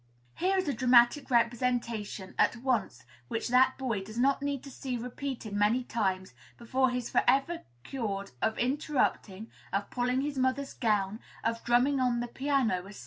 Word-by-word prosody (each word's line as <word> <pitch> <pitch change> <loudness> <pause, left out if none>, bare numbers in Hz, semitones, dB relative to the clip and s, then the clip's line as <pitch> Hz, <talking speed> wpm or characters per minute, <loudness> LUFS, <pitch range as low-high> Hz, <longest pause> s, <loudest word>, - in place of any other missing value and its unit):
Here 380 +2 +1
is 370 - 0
a 285 - +1
dramatic 250 +2 +4
representation 235 -5 0
at - - +4
once 235 - -1 0.2
which 225 - -3
that 260 +1 +4
boy 240 -7 -2
does 215 +3 -10
not 275 +3 +2
need 285 -2 -2
to 275 - -10
see 255 -1 -4
repeated 245 -2 -5
many 210 +5 +2
times 190 - -2 0.2
before 260 +3 +1
he 250 - -2
is 245 - -5
forever 275 +7 +2 0.2
cured 200 -7 -4
of 220 - 0
interrupting, 245 -6 -1 0.2
of 200 +2 -2
pulling 250 +1 0
his 280 -1 -3
mother's 260 +2 0
gown, 210 -2 0 0.2
of 230 0 -1
drumming 250 +4 +3
on 250 -2 +1
the 240 - -2
piano, 240 -8 0
&c. 205 - -11
245 Hz, 165 wpm, -30 LUFS, 220-265 Hz, 0.2 s, dramatic